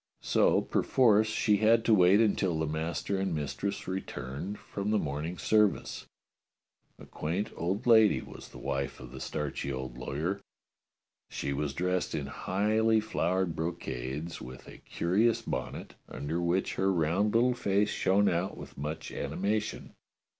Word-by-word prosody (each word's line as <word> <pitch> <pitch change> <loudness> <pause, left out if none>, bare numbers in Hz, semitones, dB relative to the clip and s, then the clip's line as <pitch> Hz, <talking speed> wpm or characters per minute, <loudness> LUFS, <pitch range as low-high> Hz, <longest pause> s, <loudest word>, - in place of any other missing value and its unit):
So - - +3
perforce 110 -4 +3
she 105 -1 +2
had 115 +2 +4
to 115 - +5
wait 95 0 +6
until 100 -6 +2
the 80 - 0
master 80 +5 -2
and 95 -3 -1
mistress 90 +7 -3
returned 95 0 -5
from 100 +1 -5
the 110 - +3
morning 80 +1 -3
service. 105 -3 +1 0.9
A - - -12
quaint 85 +7 -3
old 95 +8 -2
lady 110 -3 +6
was - - -10
the - - -12
wife 70 0 -3
of 60 -1 -10
the 65 - -8
starchy 70 0 -3
old 65 -2 -5
law^^er. 80 +10 -2 0.9
She 70 - -3
was 70 0 -2
dressed 90 0 -1
in 75 -3 -2
highly 110 +8 +1
flowered 95 -5 0
brocades, 80 -1 -4
with 65 +1 -10
a - - -12
curious 105 +7 +1
bonnet, - - -4 0.2
under 80 +4 -3
which 85 +2 0
her 95 0 +2
round 90 +5 +1
little 125 +2 +4
face 100 -3 +1
shone 100 +2 +2
out 90 +2 0
with - - -10
much 75 +2 -4
animation. 105 +3 -2
90 Hz, 145 wpm, -30 LUFS, 75-105 Hz, 0.9 s, wait